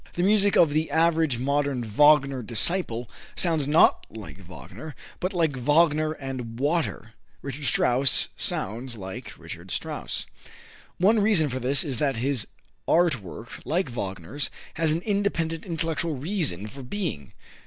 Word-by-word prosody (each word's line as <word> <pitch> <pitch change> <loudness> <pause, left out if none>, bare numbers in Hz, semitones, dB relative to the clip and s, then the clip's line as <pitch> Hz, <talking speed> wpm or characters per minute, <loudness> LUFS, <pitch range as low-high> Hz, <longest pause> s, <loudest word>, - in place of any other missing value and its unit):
The 175 - 0
music 205 0 +3
of 160 -4 +5
the 155 +2 0
average 160 -5 +2
modern 140 0 0
Wagner 135 +3 +4
disciple 120 - 0 0.3
sounds 160 -5 +1
not 155 +2 +4
like 110 -3 -10
Wagner, 100 - -11 0.2
but 185 - -2
like 165 -7 0
Wagner 155 +4 +2
and 130 -5 -7
water. 145 -6 -1 0.3
Richard 140 +1 -6
Strauss 130 +2 +4
sounds 120 +4 -1
like 95 -1 -8
Richard - - -10
Strauss. - - -3 0.7
One 210 +5 +4
reason 200 -8 +3
for 130 0 -3
this 130 +2 +3
is 135 -6 -3
that 140 -3 +1
his 130 -1 -1 0.4
art 165 -8 +3
work, 105 +5 -10
like 175 +1 -1
Wagner's, 100 - -4 0.2
has 160 -1 +1
an 160 +2 0
independent 195 -5 -1
intellectual 165 -1 -2
reason 140 - -1
for 135 +6 -9
being. 130 - -5
145 Hz, 140 wpm, -25 LUFS, 125-165 Hz, 0.7 s, of